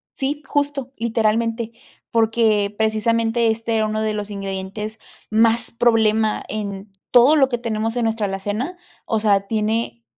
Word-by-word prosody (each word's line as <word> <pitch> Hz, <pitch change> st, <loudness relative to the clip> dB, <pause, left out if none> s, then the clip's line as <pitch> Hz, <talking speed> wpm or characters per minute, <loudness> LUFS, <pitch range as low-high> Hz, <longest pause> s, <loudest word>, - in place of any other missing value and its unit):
Sí, 290 Hz, +2 st, -2 dB
justo. 285 Hz, -3 st, -1 dB
Literalmente, 230 Hz, 0 st, 0 dB, 0.4 s
porque, 220 Hz, -3 st, +2 dB
precisamente, 225 Hz, +1 st, +1 dB
este 230 Hz, +1 st, -2 dB
era 220 Hz, -1 st, +2 dB
uno 215 Hz, 0 st, -1 dB
de 215 Hz, 0 st, 0 dB
los 210 Hz, -1 st, -4 dB
ingredientes 200 Hz, +2 st, -5 dB, 0.3 s
más 225 Hz, +1 st, +3 dB
problema 220 Hz, -2 st, +2 dB
en 200 Hz, -1 st, -5 dB, 0.2 s
todo 250 Hz, +5 st, +7 dB
lo 270 Hz, -3 st, +4 dB
que 240 Hz, -, -1 dB
tenemos 225 Hz, -1 st, -2 dB
en 235 Hz, -, +1 dB
nuestra 220 Hz, -2 st, 0 dB
alacena, 205 Hz, -, -3 dB, 0.3 s
o 225 Hz, -, 0 dB
sea, 205 Hz, -2 st, +3 dB
tiene 215 Hz, -, -1 dB
220 Hz, 140 wpm, -21 LUFS, 215-235 Hz, 0.4 s, todo